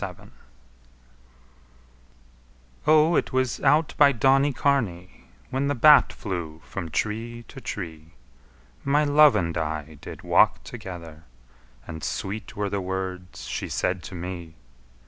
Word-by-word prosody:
XXXI - - -7 2.6
O, 155 +2 +5
it - - 0
was 130 -4 0
out 155 +1 +3
by 145 -1 +7
Donnycarney 135 -7 +1 0.2
When 135 +1 0
the 145 - 0
bat 150 +3 +7
flew 85 -6 -5
from 85 -4 -6
tree 115 +6 -3
to 135 - -10
tree 80 -6 -7 0.7
My 145 +2 +2
love 150 0 +6
and 85 -1 -1
I 80 -1 -4
did - - -9
walk - - +3
together; 85 -4 -9 0.6
And 80 -1 -8
sweet 100 +6 -4
were 100 -1 -2
the 100 -1 -1
words 95 -1 -5
she - - -4
said 90 0 -1
to 95 - -8
me. 85 -2 -7
100 Hz, 125 wpm, -25 LUFS, 85-135 Hz, 2.6 s, by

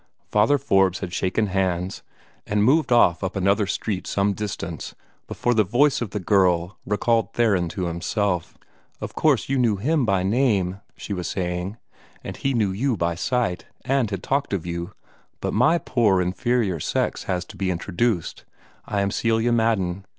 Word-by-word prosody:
Father 110 +8 +4
Forbes 95 -7 +2
had 90 -3 -5
shaken 95 +5 0
hands, 95 -1 -1 0.5
and 105 0 +1
moved 140 +4 +3
off 100 -7 +4
up 95 0 -3
another 100 +2 +2
street 100 -2 -3
some 100 0 +1
distance, 95 -5 -5 0.3
before 120 - 0
the 110 -2 +4
voice 125 +9 +2
of 120 - -2
the 105 - -4
girl 90 -2 +2
recalled 115 +2 +1
Theron 100 -8 +2
to 90 +2 -3
himself. 85 +2 -2 0.4
"Of - - -6
course - - +2
you 135 -1 0
knew 115 -4 +3
HIM 140 +9 +1
by 95 -2 +2
name," 100 -4 +1 0.2
she 105 - -5
was 90 -3 -3
saying, 90 +3 -3 0.5
"and - - -6
he 135 -1 -1
knew 105 -4 +1
you 120 +4 0
by 85 -1 0
sight, 115 0 -1 0.2
and 135 -4 +1
had 95 -3 -5
talked 140 -4 -1
of 95 -4 -2
you; 85 0 -5 0.5
but - - -3
MY 125 +10 +4
poor 115 - +2
inferior 95 +1 0
sex - - -1
has 90 -1 -2
to - - -13
be 95 -1 -2
introduced. 90 +2 -1 0.4
I 100 - 0
am 100 0 0
Celia 115 +2 +1
Madden. 100 -5 0
100 Hz, 170 wpm, -23 LUFS, 90-115 Hz, 0.5 s, Father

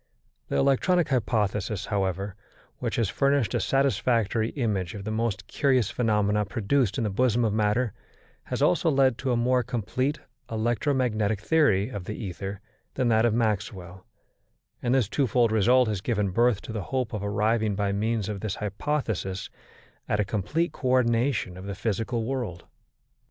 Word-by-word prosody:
The - - -3
electronic 160 +6 +2
hypothesis, 105 -5 0
however, 95 0 -2 0.4
which - - -2
has 115 -3 +1
furnished 140 +1 +1
a - - +1
satisfactory 120 -5 +1
image 105 - -2
of 100 - -6
the 110 - -4
most 110 -3 -1
curious 130 -7 +1
phenomena 105 -3 +1
produced 110 +4 0
in 120 - 0
the 105 - -1
bosom 120 +2 +2
of 105 - 0
matter, 110 +2 +1 0.5
has - - -2
also 90 - +3
led 135 -4 +3
to 130 - -1
a 120 - +2
more 125 +2 +2
complete 125 +4 -2 0.3
electromagnetic 115 -2 0
theory 110 -5 +2
of 100 -7 -6
the 105 - -5
ether 100 -1 -6 0.3
than 130 -3 +1
that 110 0 +4
of 115 -2 +2
Maxwell, 100 -4 -2 0.7
and 125 +1 +1
this 125 -6 +2
twofold 120 -2 +2
result 120 +4 +4
has 105 -4 -2
given 105 -3 0
birth 120 +1 +2
to - - -7
the 110 - -2
hope 130 -4 -2
of 105 -2 -3
arriving 105 +1 +1
by 100 0 0
means 110 +1 -1
of 105 -2 -4
this 105 0 -3
hypothesis 105 -3 -3 0.6
at 105 - +1
a 105 - +2
complete 110 - -1
co 130 - -5
ordination 120 -5 +2
of 95 +1 -8
the 100 - -4
physical 115 +3 -2
world. 120 -10 -4
110 Hz, 160 wpm, -26 LUFS, 100-125 Hz, 0.7 s, that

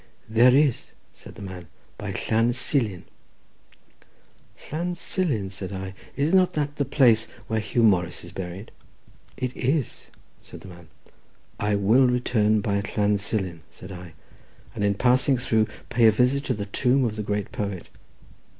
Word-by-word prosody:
"There 120 +3 +5
is," 140 -3 +1 0.2
said - - -14
the - - -9
man; 95 -2 -8 0.3
"by - - -4
Llan 115 +2 +1
Silin." 115 - -1 1.7
"Llan 175 +4 -2
Silin!" 140 - -2
said 95 0 -7
I; 95 0 -5 0.2
"is 145 +5 0
not 185 -1 +4
that 145 -1 -2
the 140 - 0
place 120 -5 +4 0.2
where 110 -2 -1
Huw 110 +3 0
Morris 90 -5 +2
is 85 - -10
buried?" 95 +2 -7 0.7
"It 125 0 -3
is," 135 +2 -1 0.3
said - - -12
the 95 - -11
man. 85 -2 -13 0.7
"I 105 0 +1
will 110 +6 +4
return 110 -4 +2
by 100 -1 0 0.2
Llan 105 -1 +2
Silin," 95 -5 -3
said 95 - -12
I, 90 -2 -9 0.6
"and - - -3
in 100 0 +2
passing 130 +4 +3
through 110 -3 +1 0.2
pay 120 -2 +4
a - - +7
visit 125 +6 +1
to - - 0
the 100 -1 -4
tomb 125 +6 +2
of 110 -2 -2
the 110 - -3
great 105 -1 -3
poet. 100 -4 -5
110 Hz, 160 wpm, -25 LUFS, 100-125 Hz, 1.7 s, a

